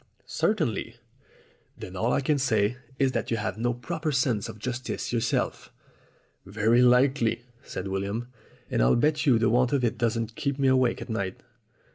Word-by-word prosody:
"Certainly." 155 - -1 0.8
"Then 95 - -9
all 115 +6 0
I - - +2
can 145 +1 +1
say 110 -3 +1 0.2
is 135 -2 +2
that - - -2
you 115 - 0
have 110 0 -3
no 120 +1 +1
proper 155 +6 -3
sense 120 -5 0
of 110 - -8
justice 125 +2 -4
yourself." 115 -2 -1 0.7
"Very 115 +3 +2
likely," 125 -1 +3 0.2
said 95 - -6
William. 100 +5 -3 0.4
"And - - +1
I'll - - +4
bet 150 +4 +1
you 125 -4 +6
the 110 -1 +2
want 125 +2 +2
of 135 -3 +1
it 120 - 0
doesn't 115 -1 -1
keep 140 +3 -2
me 135 -1 +3
awake 130 -2 +2
at - - -15
night. 100 -4 -3
120 Hz, 170 wpm, -27 LUFS, 110-135 Hz, 0.8 s, you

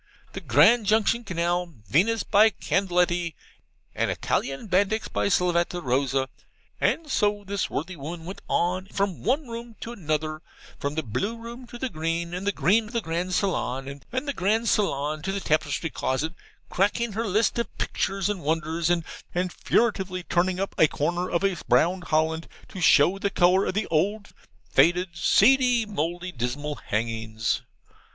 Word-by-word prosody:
The 190 - -6
Grandjunction 215 - +4
Canal, 175 -1 -1
Venis, 205 - +2
by 215 +2 +5
Candleetty; 175 -5 0 0.6
and - - 0
Italian 135 +8 -2
Bandix, 200 +3 +1
by - - -1
Slavata 175 -2 +1
Rosa.' 135 -1 0 0.5
And 325 - +1
so 205 -2 +1
this 200 +1 -2
worthy 175 +5 -4
woman 160 +3 -7
went 190 +3 -7
on, 185 +2 0
from 200 -3 -2
one 265 - 0
room 235 0 -7
into 230 - -6
another, 155 -6 -2 0.4
from 140 +1 -3
the 160 - -1
blue 200 - -2
room 235 +2 -9
to 240 - -9
the 260 - -2
green, 165 -2 -3
and 185 +3 -4
the - - +4
green 200 +7 +2
to 225 - -12
the 235 - 0
grand 175 +1 -2
saloon, 140 -8 -2
and 255 +4 -2
the 280 - -1
grand 220 +4 +1
saloon 150 -7 0
to 195 +5 -2
the 200 - -2
tapestry 155 -1 0
closet, 150 +5 -1 0.4
cackling 210 +4 +1
her 225 +2 -2
list 215 +4 +1
of 235 - -4
pictures 195 0 -1
and 205 -3 -2
wonders: 160 +2 -1
and 175 -1 +2 0.5
furtively 190 -6 0
turning 180 +1 0
up 195 - -2
a 160 - +7
corner 175 +5 -1
of 170 +2 0 0.3
brown 170 +9 +3
holland 160 0 0 0.2
to 185 - -7
show 175 +4 +5
the 200 - 0
colour 185 +1 +3
of - - -2
the 210 - 0
old, 200 +7 0 0.4
faded, 180 +2 +3
seedy, 245 - +4
mouldy, 175 -2 -3
dismal 145 +3 -3
hangings. 110 0 -1
180 Hz, 160 wpm, -25 LUFS, 155-205 Hz, 0.6 s, a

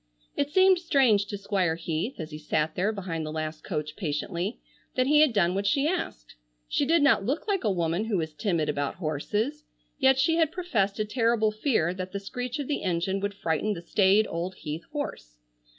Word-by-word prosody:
It 285 - 0
seemed 375 +3 +5
strange 255 - +3
to 205 - -4
Squire 195 -4 0
Heath, 165 +8 -3
as 160 -1 -6
he 150 - -7
sat 155 0 0
there 195 +4 +1
behind 180 -6 -4
the 155 - -4
last 155 0 -4
coach 155 -4 -4
patiently, 175 +5 -3 0.4
that 255 - +2
he 300 +2 +5
had 305 -4 +5
done 185 -5 +2
what 200 +1 -1
she 280 +8 +2
asked. 310 - -3 0.3
She 280 - 0
did 330 -1 +4
not 275 -8 +4
look 275 - -2
like 395 -6 0
a 215 - +2
woman 170 +2 0
who 220 -3 0
was 160 -2 -3
timid 160 0 0
about 145 -1 -1
horses, 205 - -2 0.4
yet 265 -1 +5
she 325 +4 +3
had 320 -2 +3
professed 250 - 0
a 215 - 0
terrible 225 -1 +2
fear 215 - +1
that 185 0 -6
the 200 - -2
screech 245 +6 -4
of 285 -3 -4
the 290 - -1
engine 185 +1 0
would 200 0 -3
frighten 195 +3 0
the 170 - -7
staid 200 +4 +4
old 175 +3 -4
Heath 155 -1 -6
horse. - - -5
200 Hz, 205 wpm, -27 LUFS, 165-265 Hz, 0.4 s, seemed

